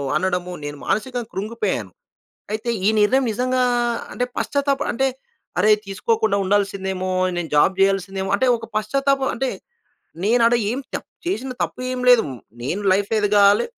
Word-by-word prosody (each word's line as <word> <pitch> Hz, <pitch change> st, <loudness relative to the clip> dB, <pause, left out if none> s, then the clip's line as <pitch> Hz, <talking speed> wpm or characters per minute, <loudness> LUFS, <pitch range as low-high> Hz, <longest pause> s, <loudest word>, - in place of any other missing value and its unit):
అనడము, 180 Hz, -1 st, -1 dB
నేను 145 Hz, 0 st, -5 dB
మానసికంగా 240 Hz, +2 st, -2 dB
కృంగిపోయాను. 200 Hz, -, -2 dB, 0.6 s
అయితే 220 Hz, +2 st, -3 dB, 0.2 s
ఈ -, -, +6 dB
నిర్ణయం 255 Hz, +6 st, +3 dB
నిజంగా 255 Hz, +3 st, 0 dB, 0.5 s
అంటే, 245 Hz, -, -1 dB
పశ్చాత్తాపం 280 Hz, -1 st, 0 dB
అంటే, 270 Hz, +3 st, +1 dB, 0.5 s
అరేయ్, 215 Hz, 0 st, +5 dB
తీసుకోకుండా 215 Hz, +1 st, 0 dB
ఉండాల్సిందేమో! 190 Hz, -1 st, -1 dB, 0.3 s
నేను 165 Hz, -2 st, -3 dB
జాబ్ 165 Hz, +6 st, +5 dB
చేయాల్సిందేమో! 195 Hz, 0 st, +1 dB
అంటే 260 Hz, -, +1 dB
ఒక 225 Hz, -, -9 dB
పశ్చాత్తాపం 270 Hz, +5 st, +1 dB
అంటే, 260 Hz, +1 st, -1 dB, 0.8 s
నేను 235 Hz, +3 st, +3 dB
ఆడ 235 Hz, -, +4 dB, 0.2 s
ఏం 250 Hz, -, -2 dB, 0.2 s
చ -, -, +3 dB, 0.3 s
చేసిన 265 Hz, -8 st, -2 dB
తప్పు -, -, -4 dB
ఏమి 250 Hz, -1 st, -3 dB
లేదు. 245 Hz, -2 st, +7 dB, 0.4 s
నేను 175 Hz, +11 st, -2 dB
లైఫ్ 200 Hz, +2 st, 0 dB
ఎదగాలి 205 Hz, -1 st, +4 dB
210 Hz, 140 wpm, -21 LUFS, 195-250 Hz, 0.8 s, లేదు